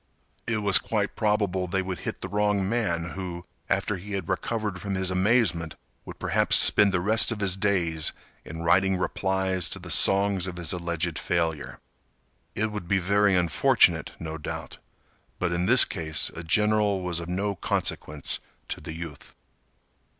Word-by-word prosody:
It 110 -3 -1
was 100 -2 +5
quite 105 -3 -2
probable 100 -4 0
they 95 +1 -1
would 95 -1 -5
hit - - -6
the - - -4
wrong 105 -2 0
man 85 -7 -1
who, 90 -2 -7 0.2
after 105 - -1
he 100 +3 -9
had 95 -4 -4
recovered 105 -5 -3
from 100 -1 -3
his 95 0 +1
amazement 95 -4 +1 0.3
would - - -10
perhaps - - +1
spend 105 -1 +5
the 90 - 0
rest 110 +6 +5
of 115 - -4
his 95 -3 +2
days 90 -6 0 0.3
in 80 +1 -8
writing 95 +3 +2
replies 95 -1 -1
to - - -1
the - - -5
songs 100 -1 +4
of 90 -1 -6
his 85 -1 -1
alleged 85 -1 -2
failure. 80 -4 -2 0.8
It 110 +1 -1
would 105 -5 -6
be 100 - +2
very 100 +2 +2
unfortunate, 85 -3 +2
no 80 0 -6
doubt, - - -7 0.6
but 90 -1 -2
in 85 +1 -1
this 125 +2 +7
case 80 -4 0
a 80 - -6
general 105 +2 +2
was 90 -1 -2
of 85 0 -7
no 100 +3 -2
consequence 75 -5 -1 0.3
to - - -4
the 80 - -7
youth. 80 -4 -9
95 Hz, 165 wpm, -25 LUFS, 85-100 Hz, 0.8 s, this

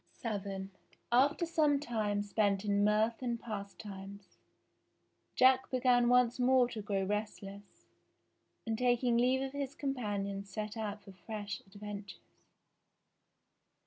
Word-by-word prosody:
VII 195 -3 -3 0.4
After 280 +7 +4
some 305 -4 +2
time 215 -6 -1
spent 205 -1 +1
in 205 0 +2
mirth 215 +3 +2
and 240 -2 -2
pastimes, 200 -2 -8 1.0
Jack 260 0 +5
began 250 -2 +3
once 250 0 +4
more 250 0 +4
to 220 -3 -5
grow 200 -1 -1
restless, 205 0 -5 0.8
and 225 -1 -1
taking 245 -1 +2
leave 255 +3 +3
of 270 - -4
his 280 -1 -4
companions 200 -7 -3
set 215 +1 -4
out 210 -2 -4
for 195 - -12
fresh 205 +1 -6
adventures. 205 0 -9
215 Hz, 115 wpm, -33 LUFS, 200-250 Hz, 1.0 s, Jack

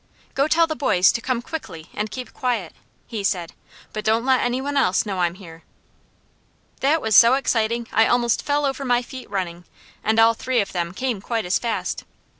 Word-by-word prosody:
"Go 275 +2 +2
tell 330 +1 +4
the 315 -1 -4
boys 185 -11 +3
to 230 - -3
come 245 -1 -2
quickly 165 - -7
and 210 +1 -3
keep 255 +2 -7
quiet," 235 -9 -2 0.3
he 215 -3 -5
said. 175 -3 -1 0.4
"But 215 - -4
don't 225 +2 +1
let 260 -1 +3
any 245 +1 0
one 285 +2 -3
else 190 -9 +2
know 195 -3 -3
I'm 175 -1 +1
here." 165 -4 -12 1.2
That 300 +4 +2
was 220 -2 +2
so 235 +2 +8
exciting 235 -3 0
I 225 - +5
almost 240 -2 +2
fell 290 0 0
over 275 0 -2
my 245 -2 +2
feet 255 +1 -10
running, 180 -3 -4 0.4
and 220 +1 +1
all 225 0 +6
three 255 +2 -1
of 200 - -1
them 175 0 -3
came 250 -5 -2
quite 225 -1 -2
as 180 - +1
fast. 235 -2 -3
230 Hz, 200 wpm, -22 LUFS, 195-260 Hz, 1.2 s, so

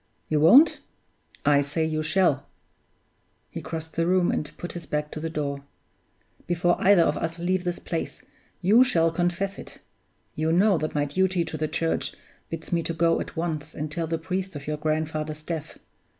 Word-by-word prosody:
You 155 - +2
won't? 240 - +7 0.7
I 145 -1 +5
say 145 +3 -1
you 155 -1 -1
shall!" 155 -3 +2 1.0
(He - - -6
crossed 160 -1 -6
the 165 0 +1
room 180 -1 +3
and 150 - -2
put 175 - -6
his 175 - -8
back 150 0 -2
to - - -5
the 165 +1 -3
door.) 140 -3 -3 0.8
"Before 175 0 +2
either 190 -3 +6
of - - +1
us 165 +1 -3
leave 180 +1 -1
this 175 0 -1
place, 165 - -5 0.4
you 210 +7 +6
shall 165 -10 +2
confess 175 +3 -1
it! - - -10 0.6
You 160 +1 0
know 190 +1 +4
that 155 0 -3
my 145 -1 +2
duty 185 +3 +1
to - - -6
the 155 0 -1
Church 165 +1 -1 0.3
bids 165 +1 -6
me 170 - +2
to 165 0 -4
go 165 +1 +2
at - - -7
once 160 -3 -3
and 150 0 -4
tell 165 +1 -2
the 165 +1 -1
priest 185 +2 -4
of 140 -1 -7
your 150 0 -2
grandfather's 155 0 -2
death. 160 -2 -5
165 Hz, 185 wpm, -26 LUFS, 155-175 Hz, 1.0 s, won't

